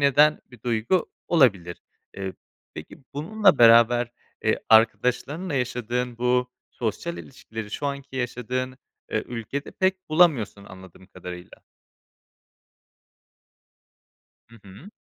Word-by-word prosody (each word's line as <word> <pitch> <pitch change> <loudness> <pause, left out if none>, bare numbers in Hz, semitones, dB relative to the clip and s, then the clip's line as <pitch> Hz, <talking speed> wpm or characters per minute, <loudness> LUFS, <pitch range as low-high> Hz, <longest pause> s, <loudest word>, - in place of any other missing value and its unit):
eden 145 +2 +4
bir 120 -3 -16
duygu 120 +9 0 0.2
olabilir. 100 - +2 0.3
Eee, 95 -1 -4 0.4
peki - - -10 0.2
bununla 195 +3 +2
beraber, 120 +1 +6 0.3
eee, - - +2
arkadaşlarınla 125 +9 +2
yaşadığın 125 -1 -2
bu 125 0 +1 0.2
sosyal 120 +10 -4
ilişkileri 110 -5 -9
şu 145 - -3
anki 140 -1 -5
yaşadığın, 125 +1 -3 0.4
ııı, - - +1
ülkede 125 +4 -6
pek 185 -1 -1
bulamıyorsun 140 - +3
anladığım 95 0 -14
kadarıyla. 90 -1 -10 2.9
Hı 115 - -16
hı. 105 - -13
125 Hz, 100 wpm, -24 LUFS, 110-145 Hz, 2.9 s, beraber